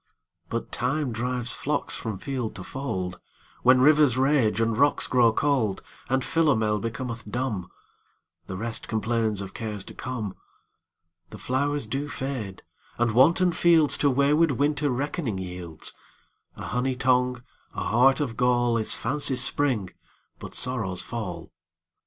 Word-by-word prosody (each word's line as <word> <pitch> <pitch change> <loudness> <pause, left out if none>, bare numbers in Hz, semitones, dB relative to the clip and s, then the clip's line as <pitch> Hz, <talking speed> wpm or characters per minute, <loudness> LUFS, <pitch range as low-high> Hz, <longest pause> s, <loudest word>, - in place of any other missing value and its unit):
But - - -4
Time 135 +2 -1
drives 125 +1 +2
flocks 145 0 -2
from 110 -4 -4
field 125 +1 -4
to 95 - -7
fold; 95 -9 -4 0.4
When 125 0 +5
rivers 145 -3 +5
rage 130 -5 +2
and 115 0 +1
rocks 145 +4 +3
grow 120 -2 +4
cold; 120 -6 0 0.3
And 130 0 +1
Philomel 110 -10 +2
becometh 115 0 -5
dumb; 120 -6 -3 0.8
The 95 - -5
rest 115 +2 -4
complains 110 -2 0
of 95 -1 -7
cares 105 -3 -5
to - - -11
come. 115 -6 -5 1.0
The 105 - -10
flowers 140 +8 -1
do 140 +2 -3
fade, 130 -9 -4 0.3
and 120 -1 +1
wanton 170 +10 +4
fieldsTo 160 -4 +3
wayward 145 +4 +3
Winter 145 +2 0
reckoning 130 - -2
yields:A 90 -3 -8
honey 125 +1 -1
tongue, 125 -1 +1 0.3
a - - -3
heart 130 +5 +4
of 130 -6 -2
gall, 120 -1 +2
Is 110 - +2
fancy's 135 -3 +2
spring, 125 -10 0 0.5
but - - -8
sorrow's 110 -8 -1
fall. 90 -8 -6
125 Hz, 135 wpm, -25 LUFS, 110-140 Hz, 1.0 s, When